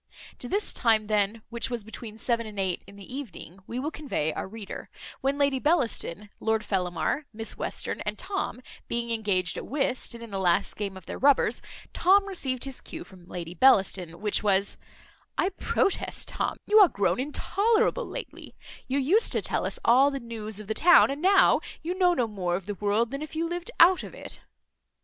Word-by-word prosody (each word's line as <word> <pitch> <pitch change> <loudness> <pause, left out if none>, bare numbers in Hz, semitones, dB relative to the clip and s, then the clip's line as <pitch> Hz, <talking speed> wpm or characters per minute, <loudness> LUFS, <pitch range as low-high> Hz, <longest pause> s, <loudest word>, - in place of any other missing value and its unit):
To 245 - -6
this 410 +2 0
time 225 -3 +3
then, 210 +1 0
which 235 +2 -1
was 240 -3 -3
between 220 0 -8
seven 230 0 -1
and 210 -2 -7
eight 190 -2 -1
in 200 - -13
the 200 +5 -10
evening, 200 - -8
we 240 - -5
will 285 +5 -2
convey 250 - -2
our - - -4
reader; 210 0 -8 0.3
when 275 +1 0
Lady 280 -2 +2
Bellaston, 230 - 0
Lord 220 -1 0
Fellamar, 180 - -1
Miss 225 0 -3
Western, - - -3
and - - -3
Tom, 385 -10 -4 0.2
being 235 0 -2
engaged 200 -6 0
at - - -6
whist, 265 -3 0
and 235 - -9
in 230 - -10
the 195 - -3
last 180 +1 +2
game 200 -2 -4
of 185 - -13
their - - -6
rubbers, 280 0 +3 0.3
Tom 395 +3 +4
received 265 -10 -3
his 270 -2 -6
cue - - -8
from 180 -2 -17
Lady 170 -2 -6
Bellaston, 190 -6 +3
which 210 -1 +1
was, 200 -2 +2 0.6
"I 370 - +2
protest, 390 0 -1
Tom, - - -2
you 430 +1 +6
are 400 - +9
grown 200 -4 0
intolerable 440 - +1
lately; - - -8 0.3
you 265 +2 0
used 340 - +3
to - - +1
tell - - -1
us - - -3
all 260 +4 +6
the 275 -1 -4
news 220 -3 -5
of 215 - -8
the 220 - -2
town, 350 +2 +6
and 280 +2 -5
now 385 +2 +5 0.2
you 345 +3 -1
know 360 -2 +3
no 245 - +2
more 185 -5 -2
of 185 0 -5
the 205 - -3
world 210 +4 0
than 275 +1 -4
if 310 +1 -7
you 325 +1 0
lived 350 +5 -4
out 360 +2 +7
of - - -9
it." - - -8
235 Hz, 200 wpm, -27 LUFS, 200-290 Hz, 0.6 s, are